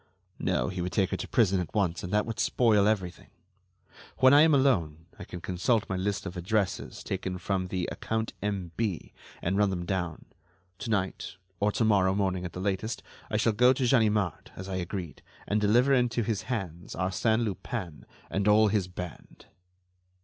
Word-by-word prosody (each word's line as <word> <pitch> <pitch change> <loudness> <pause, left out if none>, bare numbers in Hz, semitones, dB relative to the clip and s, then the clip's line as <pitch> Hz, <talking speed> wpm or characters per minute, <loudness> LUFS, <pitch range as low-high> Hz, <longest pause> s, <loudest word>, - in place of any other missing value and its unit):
No, - - 0
he 90 -1 -4
would 90 +1 -3
take 95 -1 +1
her - - -1
to - - -5
prison 100 -5 +3
at 90 +2 -5
once, 90 -5 +1
and 90 - -6
that 105 0 +2
would 115 -1 -5
spoil 105 -4 +3
everything. 95 -5 -2 0.9
When 130 +1 +6
I 145 - +8
am 160 +1 +6
alone, 85 - +1
I - - -7
can 90 - -8
consult 95 +5 0
my 95 - -2
list 100 +2 -2
of 95 -1 -6
addresses 95 +1 -2
taken 95 -1 -3
from 95 0 -2
the 90 -1 -2
'account 110 0 -3
M.B.,' 100 -1 -3 0.3
and 95 +3 0
run 105 -1 +4
them 90 -2 -3
down. 90 -4 -3 0.5
To 105 - -5
night, 100 -2 -2 0.2
or 105 +1 +2
to 115 - +1
morrow 95 -3 +3
morning 95 -2 0
at 85 - -6
the - - -6
latest, 100 +4 -2 0.3
I 105 - 0
shall 110 +1 +2
go 125 +4 +5
to 130 -1 0
Ganimard, 105 - +1
as 95 - -7
I 95 -1 -3
agreed, 90 -2 -5 0.3
and 105 +1 +1
deliver 120 +6 +4
into 120 -2 +2
his 105 -1 -3
hands 95 -7 -4
Arsène 110 +5 +1
Lupin 95 - -5 0.2
and 100 +1 0
all 105 +1 +6
his 100 -3 0
band." 90 -2 -9
100 Hz, 185 wpm, -28 LUFS, 90-110 Hz, 0.9 s, I